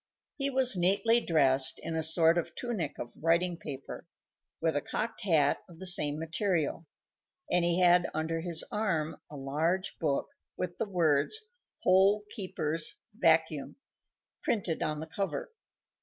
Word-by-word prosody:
He 280 -1 -1
was 260 -4 +3
neatly 200 +6 +3
dressed 135 -5 +6
in 165 - -4
a 160 - 0
sort 165 +1 +4
of 170 - -6
tunic 210 - -4
of 120 - -7
writing 170 +2 +2
paper, 140 -5 -8 0.5
with 160 -2 0
a 145 - 0
cocked 230 +9 -4
hat 155 -6 +2
of 170 - -14
the 190 - -8
same 150 -5 +1
material, 165 -1 -2 0.6
and 180 -1 +3
he 175 +1 +2
had 180 0 +4
under 160 +1 -2
his 170 -2 -1
arm 170 -8 -2
a 150 - -10
large 155 +7 -2
book, 145 -4 -1 0.3
with 175 -1 -5
the 225 - -2
words 180 - +1 0.3
"HOLE 195 +3 +4
KEEPER'S 165 -6 -1 0.2
VACUUM" 160 -6 +1 0.7
printed 190 -8 -1
on 150 0 -2
the - - -5
cover. 170 - -4
165 Hz, 145 wpm, -30 LUFS, 155-190 Hz, 0.7 s, dressed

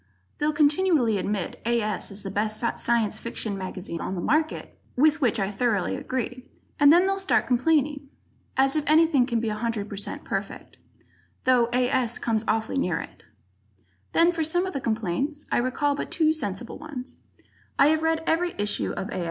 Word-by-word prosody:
They'll 300 +1 +2
continually 295 - +3
admit 200 -2 -3
A. 235 0 +1
S. 210 -1 -2
is 200 0 -8
the 195 - -5
best 215 +1 -1 0.2
Science 225 -2 +1
Fiction 220 -3 -3
mag 190 0 -5 0.2
on 190 - -3
the - - -3
market 310 - -1 0.2
(with 310 +4 +3
which 240 -3 +2
I 195 0 -1
thoroughly 205 -2 0
agree) 255 0 -4 0.3
and 290 -1 +7
then 350 +3 +6
they'll 390 0 0
start 385 - +2
complaining. 280 +2 +1 0.5
As 270 +1 +3
if 305 - +1
anything 310 -4 +4
can 235 -3 0
be 225 -1 -1
100% 210 -2 -4
perfect - - -5 0.7
though 250 -2 +4
A. 250 0 +2
S. 250 -4 0
comes 225 -2 -1
awfully 220 +4 0
near - - 0
it! - - -10 0.9
Then 340 +1 +5
for 335 -2 -1
some 350 +4 +1
of 380 - -5
the 275 - -3
complaints, 230 - -2
I - - +3
recall 265 +4 0
but 285 - -4
two 315 -2 +2
sensible 240 -5 -5
ones. 275 -5 -8 0.6
I 280 - +6
have 315 0 +2
read 320 0 +1
every 345 +2 0
issue 205 0 -1
of 195 - -4
A. 190 - -3
255 Hz, 175 wpm, -25 LUFS, 220-310 Hz, 0.9 s, and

